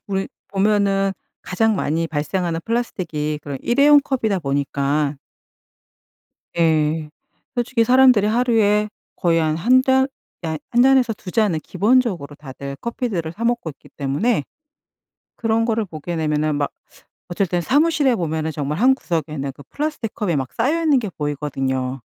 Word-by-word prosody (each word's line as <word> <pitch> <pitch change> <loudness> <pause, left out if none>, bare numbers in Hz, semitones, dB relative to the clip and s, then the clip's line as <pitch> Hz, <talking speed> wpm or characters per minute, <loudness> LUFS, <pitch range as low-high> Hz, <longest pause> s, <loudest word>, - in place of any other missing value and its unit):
우리 195 -1 -2 0.2
보면은 195 -1 +2 0.3
가장 220 +4 +1
많이 165 -2 -1
발생하는 165 +2 -2
플라스틱이 170 -10 -2
그런 140 -2 -5
일회용 285 +4 +5
컵이다 225 -8 0
보니까 140 0 -1 1.4
예. 155 -1 +2 0.5
솔직히 240 -1 +1
사람들이 250 -4 +5
하루에 215 -2 +2 0.3
거의 170 -2 +2
한 155 -1 0
1 250 +10 +4
잔 265 0 +3 0.3
아 160 -1 -2
1 240 - +4
잔에서 260 -3 +4
2 200 -3 -9
잔은 205 -6 +1
기본적으로 200 - +1
다들 140 -1 -8
커피들을 225 -9 -3
사 225 +7 -6
먹고 240 -7 0
있기 140 - -18
때문에 145 - 0 0.9
그런 225 0 +1
거를 225 -2 0
보게 170 0 -6
되면은 155 -1 0
막 145 -1 -1 0.6
어쩔 180 +3 0
때는 175 0 -1
사무실에 290 - +3
보면은 160 -5 -2
정말 150 0 -3
한 260 +3 +5
구석에는 155 - -3
그 145 - -14
플라스틱 295 -7 -3
컵이 180 -7 -1
막 130 -2 -3
쌓여 295 +8 0
있는 295 -5 +4
게 220 - -3
보이거든요. 135 -4 -3
185 Hz, 310 characters per minute, -21 LUFS, 150-235 Hz, 1.4 s, 일회용